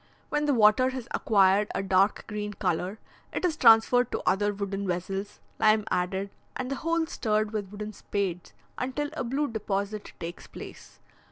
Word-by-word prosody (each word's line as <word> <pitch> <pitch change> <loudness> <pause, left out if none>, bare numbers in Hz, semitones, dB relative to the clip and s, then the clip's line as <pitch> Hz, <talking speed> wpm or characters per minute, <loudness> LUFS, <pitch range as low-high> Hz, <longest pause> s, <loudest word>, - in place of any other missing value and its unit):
When 295 0 0
the 290 - +3
water 220 +3 +5
has 260 -3 -6
acquired 200 -1 +3
a - - -1
dark 195 +1 +2
green 210 -1 -4
colour, 185 +1 -1 0.3
it - - -1
is 335 -3 +1
transferred 245 -1 +5
to - - -3
other 205 +2 +3
wooden 200 -1 -3
vessels, 195 +3 -3 0.2
lime 215 -1 +4
added, 190 +2 -1 0.2
and 255 +1 -4
the 275 - -1
whole 330 +2 0
stirred 215 -9 0
with 205 -3 -3
wooden 210 +1 -6
spades 190 -4 -3 0.3
until 285 +4 -2
a 310 - -3
blue 275 +5 0
deposit 205 -2 -3
takes 170 +1 -7
place. - - -11
210 Hz, 165 wpm, -28 LUFS, 195-250 Hz, 0.3 s, water